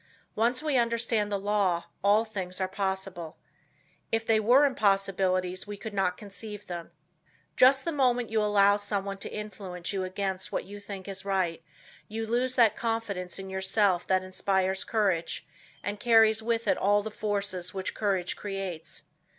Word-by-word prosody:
Once 240 +5 +1
we 300 -4 +2
understand 230 -2 +1
the 200 - +1
law, 195 -4 +1 0.2
all 210 +3 +4
things 190 -4 -5
are 190 - 0
possible. 190 -4 -4 0.7
If 225 0 0
they 225 -1 +4
were 245 +7 +5
impossibilities 195 -5 +1
we 205 0 -6
could 220 +1 -7
not 190 -2 +1
conceive 210 0 -6
them. 175 -2 -6 0.7
Just 265 +1 +5
the 335 - 0
moment 245 -5 +1
you 220 -1 +2
allow 205 -1 +4
someone 200 -1 -3
to - - -6
influence 195 -4 -5
you 190 -1 -1
against 190 0 -2
what - - -2
you 205 +1 -9
think 200 -2 -8
is 190 -1 -3
right, 185 -4 -1 0.4
you 225 +1 -4
lose 250 +3 0
that 230 -4 +5
confidence 225 -6 -3
in 195 0 -7
yourself 190 -1 +1
that 185 -1 +2
inspires 190 0 0
courage 195 -7 0 0.4
and 205 +1 -3
carries 225 -1 +5
with 230 0 -1
it - - +2
all 205 +1 +3
the 220 - -5
forces 200 -4 -2
which 190 -1 -3
courage 195 -4 0
creates. 195 -5 -5
200 Hz, 160 wpm, -28 LUFS, 190-220 Hz, 0.7 s, were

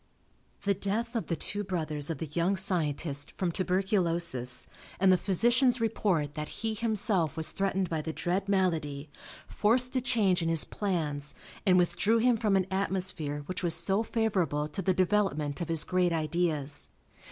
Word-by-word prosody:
The 200 - +2
death 215 +5 -3
of 230 - -2
the 165 - -1
two 205 +5 -1
brothers 155 -6 -2
of 165 - -2
the 160 - -4
young 175 +4 +1
scientist 150 -5 0
from 180 -3 -2
tuberculosis, 175 - 0 0.3
and 190 0 +5
the - - +6
physician's 240 +7 +3
report 190 -10 0
that 150 0 -5
he 220 -1 0
himself 210 - 0
was 160 - +2
threatened 195 -1 -1
by 160 -2 -2
the 160 - -4
dread 185 +5 -2
malady, 155 -7 -1 0.4
forced 245 +5 +1
a 255 - +2
change 210 -8 +2
in 165 - 0
his 165 -2 +1
plans 150 -8 -3 0.3
and 180 -1 +6
withdrew 180 +5 +2
him 240 +1 +3
from 215 -3 +1
an 190 -1 +2
atmosphere 185 -6 -1
which 185 +2 -5
was 170 -2 +5
so 195 +2 +2
favorable 195 -10 0
to 195 - -3
the 185 0 +1
development 185 -6 0
of 170 - -4
his 165 -2 +3
great 180 -1 +1
ideas. 155 -3 -1
185 Hz, 165 wpm, -29 LUFS, 160-205 Hz, 0.4 s, the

